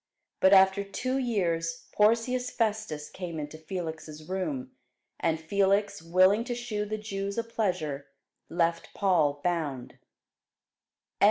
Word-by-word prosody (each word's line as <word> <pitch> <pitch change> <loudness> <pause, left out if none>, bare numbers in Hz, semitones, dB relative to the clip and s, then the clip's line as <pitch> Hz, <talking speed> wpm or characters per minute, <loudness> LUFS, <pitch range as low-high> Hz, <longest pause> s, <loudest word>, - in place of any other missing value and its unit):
But 190 - +5
after 190 0 +6
two 255 +7 -2
years 170 -9 -1
Porcius 235 +4 +2
Festus 215 -10 -1
came 170 -4 -6
into 150 +1 -6
Felix' 160 -2 -6
room: 255 +8 -3 0.5
and 160 -1 +1
Felix, 200 +3 +1
willing 185 +6 +4
to 245 - -3
shew 220 -4 -3
the 215 +1 -3
Jews 200 -1 -4
a 230 - +1
pleasure, 180 -11 -2 0.4
left 170 -1 0
Paul 155 -8 +2
bound. 155 -8 -2
190 Hz, 115 wpm, -28 LUFS, 165-215 Hz, 0.5 s, after